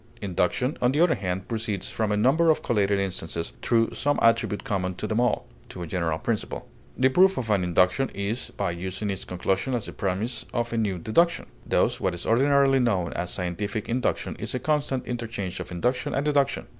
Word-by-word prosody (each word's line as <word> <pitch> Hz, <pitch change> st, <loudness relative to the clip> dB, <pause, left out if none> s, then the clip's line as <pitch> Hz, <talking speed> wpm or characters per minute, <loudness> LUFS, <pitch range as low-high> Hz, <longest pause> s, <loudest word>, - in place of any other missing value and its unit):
Induction, 105 Hz, -, 0 dB
on 125 Hz, 0 st, +4 dB
the 145 Hz, -, +1 dB
other 175 Hz, 0 st, +5 dB
hand, 95 Hz, -1 st, -3 dB
proceeds 110 Hz, -4 st, -3 dB
from 110 Hz, -2 st, -1 dB
a 105 Hz, -, +1 dB
number 140 Hz, +10 st, +4 dB
of 155 Hz, -, +3 dB
collated 100 Hz, -4 st, +2 dB
instances, 85 Hz, -7 st, -3 dB
through 115 Hz, -1 st, +2 dB
some 145 Hz, +1 st, +1 dB
attribute 115 Hz, -3 st, +2 dB
common 95 Hz, -2 st, -2 dB
to 105 Hz, -, -4 dB
them 110 Hz, +1 st, 0 dB
all, 125 Hz, 0 st, +1 dB, 0.2 s
to 90 Hz, -, -7 dB
a -, -, -4 dB
general 80 Hz, -1 st, -1 dB
principle. 110 Hz, +5 st, -3 dB, 0.3 s
The 130 Hz, +1 st, +4 dB
proof 190 Hz, +7 st, +4 dB
of 115 Hz, -4 st, -2 dB
an 100 Hz, -3 st, +3 dB
induction 90 Hz, +9 st, +2 dB
is 100 Hz, +5 st, -2 dB
by 95 Hz, -3 st, 0 dB
using 95 Hz, +4 st, -3 dB
its 95 Hz, -, -5 dB
conclusion 95 Hz, +8 st, -1 dB
as 115 Hz, -, -2 dB
the -, -, -7 dB
premise 100 Hz, +6 st, -2 dB
of 120 Hz, -1 st, -1 dB
a -, -, 0 dB
new 100 Hz, -5 st, 0 dB
deduction. 170 Hz, -, +2 dB, 0.2 s
Thus -, -, +2 dB
what 95 Hz, -2 st, 0 dB
is 85 Hz, -, -6 dB
ordinarily 135 Hz, +2 st, +4 dB
known 100 Hz, -9 st, +1 dB
as 85 Hz, 0 st, -3 dB
scientific 100 Hz, +5 st, -2 dB
induction 125 Hz, +2 st, -1 dB
is -, -, -3 dB
a -, -, -1 dB
constant 145 Hz, -2 st, 0 dB
interchange 115 Hz, -6 st, -4 dB
of -, -, -6 dB
induction 120 Hz, +9 st, -1 dB
and 135 Hz, -, 0 dB
deduction. 140 Hz, -2 st, +1 dB
110 Hz, 200 wpm, -26 LUFS, 95-125 Hz, 0.3 s, other